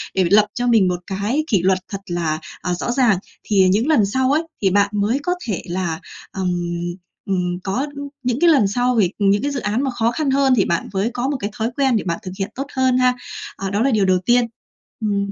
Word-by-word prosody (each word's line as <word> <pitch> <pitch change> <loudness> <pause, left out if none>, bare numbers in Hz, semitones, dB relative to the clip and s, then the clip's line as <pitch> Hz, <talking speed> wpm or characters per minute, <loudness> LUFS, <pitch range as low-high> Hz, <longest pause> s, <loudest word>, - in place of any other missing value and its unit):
Để 190 - +3
phải 170 - 0
lập 210 +1 +6
cho 245 +2 -1
mình 225 -6 +4
một 180 -1 -1
cái 205 +10 -1
kỷ 200 - +2
luật 185 +1 +2
thật 195 -1 -4
là, 165 -3 -1 0.2
à, 180 - -1
rõ 180 +7 -2
ràng, 240 -6 +3 0.3
thì 190 -3 +3
những 210 +8 +2
lần 295 -10 +4
sau 260 +6 +1
ấy, 310 +3 +2 0.2
thì 195 - +3
bạn 200 +1 +3
mới 210 +6 +1
có 355 - +1
thể 200 -6 -2
là 175 -2 -2 0.3
ừm, 190 -2 -2 0.8
ừm, 180 -2 -1
có 245 +9 -1 0.4
những 250 0 0
cái 345 - +6 0.3
sau 250 0 +2
vì 195 -6 +3
những 200 0 +3
cái 285 +2 -1
dự 280 - -2
án 220 +4 -1
mà 270 - 0
khó 230 -1 +1
khăn 280 +2 -1
hơn 270 -1 +3
thì 200 - +3
bạn 170 -1 -1
mới 200 +5 0
có 250 +2 -1
một 285 - -1
cái 205 - -3
thói 225 0 0
quen 270 -3 +3
để 215 - 0
bạn 170 -2 -2
thực 185 - -6
hiện 195 - -2
tốt 275 +2 -4
hơn 260 -1 +3
ha. 255 0 +4 0.4
À, 195 - -3
đó 205 +2 0
là 270 +3 +3
điều 210 -4 +3
đầu 185 -1 +3
tiên. 240 +2 +4 0.6
Ừm, 200 -2 -1
210 Hz, 245 wpm, -20 LUFS, 190-250 Hz, 0.8 s, lập